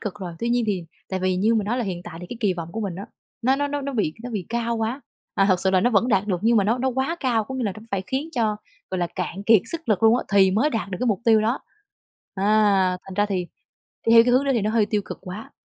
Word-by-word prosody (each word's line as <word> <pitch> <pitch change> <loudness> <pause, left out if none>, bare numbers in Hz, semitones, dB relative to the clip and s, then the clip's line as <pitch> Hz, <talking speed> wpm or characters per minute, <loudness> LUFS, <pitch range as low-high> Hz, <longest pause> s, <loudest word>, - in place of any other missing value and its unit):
cực 210 -3 -4
rồi. 180 -3 -5
Tuy 235 - -2
nhiên 240 -1 +2
thì 190 -5 -1 0.2
tại 190 -1 -3
vì 185 0 +1
như 215 +5 +2
mình 215 -3 +1
nói 240 +4 0
là 240 - -1
hiện 180 -3 -4
tại 165 - -8
thì 180 - -8
cái 245 - -5
kỳ 200 -5 +1
vọng 170 -1 -7
của 225 - -4
mình 195 -5 -3
á, 200 - -7 0.4
nó 260 +3 +3
nó 285 +1 0
nó 290 0 -2
nó 280 0 -4
bị 180 -9 0
nó 245 - -5
bị 200 -6 -4
cao 235 0 -1
quá. 225 +5 -2 0.3
À, 195 - +3
thực 185 -2 +3
sự 190 - +2
là 185 -1 +3
nó 245 - +2
vẫn 225 +2 +2
đạt 205 -3 +2
được 185 -4 0
nhưng 230 +1 +4
mà 205 - +3
nó 230 +5 +1
nó 265 - 0
quá 265 +6 -1
cao. 235 -5 +1
Có 265 - -7
nghĩa 260 -2 -2
là 205 - -1
nó 215 - -11
phải 195 -1 -1
khiến 270 +4 -2
cho, 220 -5 0 0.3
gọi 185 - -2
là, 175 - 0
cạn 185 +2 -4
kiệt 215 -2 +5
sức 330 -5 -6
lực 210 -1 +1
luôn 225 +1 +6
á, - - -4
thì 195 -1 +6
mới 230 +11 +2
đạt 220 -4 -3
được 185 - -4
cái 250 - 0
mục 210 -3 +1
tiêu 225 -2 +5
đó. 225 +5 0 0.8
À, 200 -2 +3
thành 190 - -9
ra 205 +2 +2
thì 185 -3 -2 0.6
đi 225 - +5
theo 230 0 +8
cái 245 - +2
hướng 255 +3 +4
đó 275 - +2
thì 230 - +2
nó 215 - 0
hơi 220 -2 +2
tiêu 210 -1 0
cực - - -7
quá. 190 +4 -8
215 Hz, 310 wpm, -23 LUFS, 190-235 Hz, 0.8 s, theo